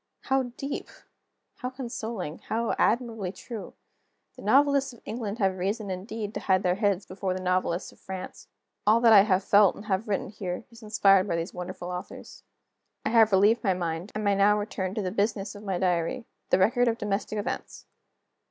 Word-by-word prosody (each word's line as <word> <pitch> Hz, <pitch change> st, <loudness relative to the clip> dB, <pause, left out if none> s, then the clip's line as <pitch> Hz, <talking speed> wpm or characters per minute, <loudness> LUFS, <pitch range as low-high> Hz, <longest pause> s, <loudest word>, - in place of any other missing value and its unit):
How 265 Hz, -2 st, 0 dB
deep! 275 Hz, +1 st, -4 dB, 0.7 s
how 250 Hz, -, -4 dB
consoling! 230 Hz, -, -5 dB
how 230 Hz, +1 st, 0 dB
admirably 225 Hz, -5 st, +1 dB
true! 215 Hz, +3 st, -8 dB, 0.6 s
The -, -, -12 dB
novelists 280 Hz, -1 st, +3 dB
of 235 Hz, -, -16 dB
England 215 Hz, -1 st, -4 dB
have 190 Hz, -4 st, 0 dB
reason 200 Hz, +2 st, -2 dB
indeed 205 Hz, +3 st, -5 dB
to -, -, -3 dB
hide 190 Hz, 0 st, +2 dB
their 180 Hz, -1 st, +3 dB
heads 200 Hz, -1 st, 0 dB
before 185 Hz, 0 st, -3 dB
the -, -, -3 dB
novelists 185 Hz, -1 st, -1 dB
of -, -, -21 dB
France. 190 Hz, -1 st, -8 dB, 0.4 s
All 220 Hz, +2 st, +6 dB
that 230 Hz, -2 st, +7 dB
I 200 Hz, -, +10 dB
have 195 Hz, -2 st, +2 dB
felt, 205 Hz, -1 st, +5 dB
and 205 Hz, -, -10 dB
have 205 Hz, +1 st, -1 dB
written 200 Hz, -2 st, -1 dB
here, 185 Hz, -1 st, -5 dB
is 230 Hz, -, -15 dB
inspired 200 Hz, -3 st, +4 dB
by 170 Hz, -, 0 dB
these 165 Hz, +2 st, -3 dB
wonderful 180 Hz, 0 st, -6 dB
authors. 180 Hz, 0 st, -8 dB, 0.6 s
I -, -, +2 dB
have 225 Hz, -2 st, +5 dB
relieved 205 Hz, +4 st, +4 dB
my 190 Hz, -4 st, +2 dB
mind, 170 Hz, +2 st, -3 dB
and 215 Hz, -, -2 dB
may 205 Hz, -1 st, +3 dB
now 200 Hz, +1 st, +4 dB
return 200 Hz, -2 st, -3 dB
to 215 Hz, -, -1 dB
the 185 Hz, -, -2 dB
business 200 Hz, -1 st, -1 dB
of 205 Hz, -, -10 dB
my 195 Hz, -3 st, -2 dB
diary 180 Hz, +7 st, 0 dB, 0.2 s
the -, -, +4 dB
record 240 Hz, +6 st, +3 dB
of 230 Hz, -1 st, +1 dB
domestic 210 Hz, 0 st, -2 dB
events. 205 Hz, -, -5 dB
205 Hz, 190 wpm, -27 LUFS, 185-225 Hz, 0.7 s, I